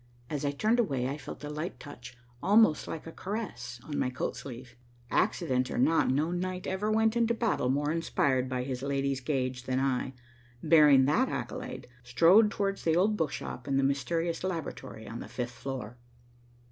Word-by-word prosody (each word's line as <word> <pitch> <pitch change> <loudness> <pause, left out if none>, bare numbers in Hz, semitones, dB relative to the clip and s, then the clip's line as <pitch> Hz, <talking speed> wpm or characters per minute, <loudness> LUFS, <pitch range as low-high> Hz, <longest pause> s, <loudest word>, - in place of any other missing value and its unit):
As 150 -2 -2
I 145 - +1
turned 215 +12 +1
away, 135 - +1
I 140 - -2
felt 140 +1 -9
a 145 - -5
light 155 +4 -5
touch, 125 -4 -11 0.2
almost 205 -6 +4
like 160 - -6
a 165 - -7
caress, 185 - -5
on 145 0 -4
my - - +1
coat 125 - -3
sleeve. 125 -1 -9 0.4
Accident 130 -1 +1
or - - -4
not, 150 +6 +3
no 150 +6 +1
knight 180 +1 -3
ever 190 +3 -1
went 220 +1 +2
into 235 0 +2
battle 225 - 0
more 145 +3 +1
inspired 135 -5 +1
by 125 -1 -1
his 130 -1 -4
lady's 140 -1 -1
gage 130 -2 -2
than 130 0 0
I, 135 -1 -1 0.5
bearing 150 -4 +6
that 240 - +2
accolade, 255 0 -5 0.2
strode 170 - +5
towards 195 -1 -2
the 160 -1 +2
old 200 +5 +3
book 160 -8 0
shop 125 - -6
and 135 -1 +1
the 135 - +2
mysterious 165 +5 0
laboratory 165 -10 -5
on 115 +2 -6
the - - -7
fifth 120 -1 -4
floor. 125 -4 -6
145 Hz, 185 wpm, -30 LUFS, 130-185 Hz, 0.5 s, bearing